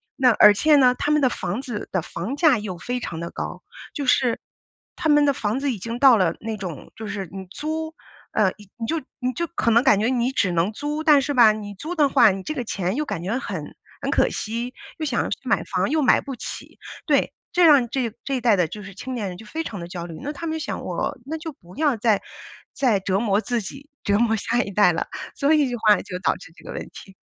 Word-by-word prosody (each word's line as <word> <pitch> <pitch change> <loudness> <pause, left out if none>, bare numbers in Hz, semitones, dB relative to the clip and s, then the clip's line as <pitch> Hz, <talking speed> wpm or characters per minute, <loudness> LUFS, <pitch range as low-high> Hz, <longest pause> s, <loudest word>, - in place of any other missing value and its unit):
那 255 -2 +4
而 210 -1 +7
且 300 +7 +4
呢， 250 -2 +5
他 295 - -1
们 300 -1 +3
的 260 - +5
房 240 0 -3
子 240 -6 -6
的 185 - 0
房 225 - -5
价 305 -7 +5
又 195 -4 -5
非 245 +6 -4
常 165 - -5
地 170 0 -4
高， - - -6 0.3
就 285 - -3
是 250 -2 +2 0.6
他 320 -3 -1
们 295 0 +5
的 280 - +3
房 220 +2 -1
子 275 -2 0
已 - - -5
经 230 +5 -5
到 265 -4 +8
了 185 -5 +2
那 220 0 -4
种， 180 -7 -7
就 220 - -7
是 195 -3 -4
你 190 -1 -6
租， 315 +3 -4 0.4
呃， 200 -4 +2 0.3
你 230 - -4
就 325 -1 -1 0.2
你 255 0 -1
就 340 - -2
可 230 -8 0
能 235 +3 +5
感 200 - +5
觉 220 - +1
你 250 0 +1
只 190 -8 +1
能 170 +5 +1
租， 295 +4 -3
但 295 -4 +6
是 285 +2 -2
吧， 235 -4 +7
你 205 -1 -6
租 320 - -5
的 295 -3 +4
话， 245 -7 +6
你 190 0 -5
这 310 - -3
个 260 -5 -3
钱 195 -2 -2
又 300 +1 -1
感 200 -8 -4
觉 220 +7 -1
很 - - -6 0.3
很 - - -2
可 - - +3
惜， 235 +3 -4 0.3
又 310 - -2
想 245 -5 0
去 - - -2
买 - - +1
房， - - -1
又 310 0 +2
买 260 - +4
不 275 - -6
起。 - - -8 0.3
对， - - +2 0.2
这 355 -1 +4
样 275 -7 +6
这 245 -4 -1
这 275 - -2
一 - - -5
代 230 -3 +4
的 180 -3 +2
就 210 +3 -8
是 195 -1 -10
青 255 +5 -6
年 210 -4 -2
人 180 - -8
就 220 - -12
非 320 +9 -4
常 205 - -6
地 170 - -6
焦 175 -1 -6
虑， 165 -2 -8
那 290 - -3
他 315 +4 -6
们 320 0 -2
就 - - -4
想 - - -4
我 - - -3
那 315 +3 -4
就 320 0 -6
不 180 -9 -17
要 295 -6 +1
再 215 -2 +2 0.5
再 235 -8 +2
折 190 0 0
磨 205 -2 +1
自 240 -1 -1
己， 275 +9 -10 0.2
折 205 0 +3
磨 230 -1 +3
下 240 +4 0
一 200 - -7
代 190 -3 +4
了， - - -2 0.3
所 285 +3 +3
以 295 -4 +3
这 245 - -2
话 215 -2 +5
就 180 -3 -6
导 - - +1
致 165 - -14
这 - - -17
个 - - -7
问 - - -4
题。 195 - -13
235 Hz, 275 characters per minute, -23 LUFS, 205-280 Hz, 0.6 s, 到